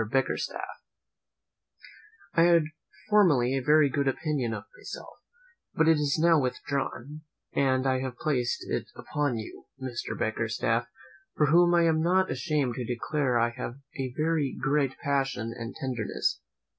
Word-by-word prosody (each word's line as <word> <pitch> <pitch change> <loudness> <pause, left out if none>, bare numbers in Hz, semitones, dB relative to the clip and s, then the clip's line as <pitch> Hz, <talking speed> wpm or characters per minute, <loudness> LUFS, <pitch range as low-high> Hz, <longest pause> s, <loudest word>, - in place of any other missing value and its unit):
BICKERSTAFF, 125 +5 -2 1.5
"I 165 - +4
had 170 -1 +6 0.4
formerly 150 - +4
a 135 - 0
very 150 +2 +5
good 140 +1 -1
opinion 135 -3 -1
of - - -4
myself; - - -9 0.6
but 160 - +3
it 160 -1 +6
is 145 0 +1
now 165 -1 +5
withdrawn, 140 +2 -3 0.3
and 130 -1 +2
I 130 -1 +2
have 130 -2 -4
placed 125 -5 -1
it - - -2
upon 145 -5 -2
you, 110 - -8
Mr. 130 -2 -4
Bickerstaff, 115 +1 0 0.5
for 150 - +4
whom 175 +1 +5
I 170 - +4
am 160 -1 +3
not 185 +3 +2
ashamed 150 -7 0
to 125 - -2
declare 125 +2 0
I 120 0 +2
have 120 0 -6 0.2
a 130 -1 -2
very 155 -3 0
great 140 -1 +1
passion 135 -5 -1
and 115 -1 -7
tenderness. 130 -7 -2
135 Hz, 145 wpm, -28 LUFS, 125-155 Hz, 1.5 s, had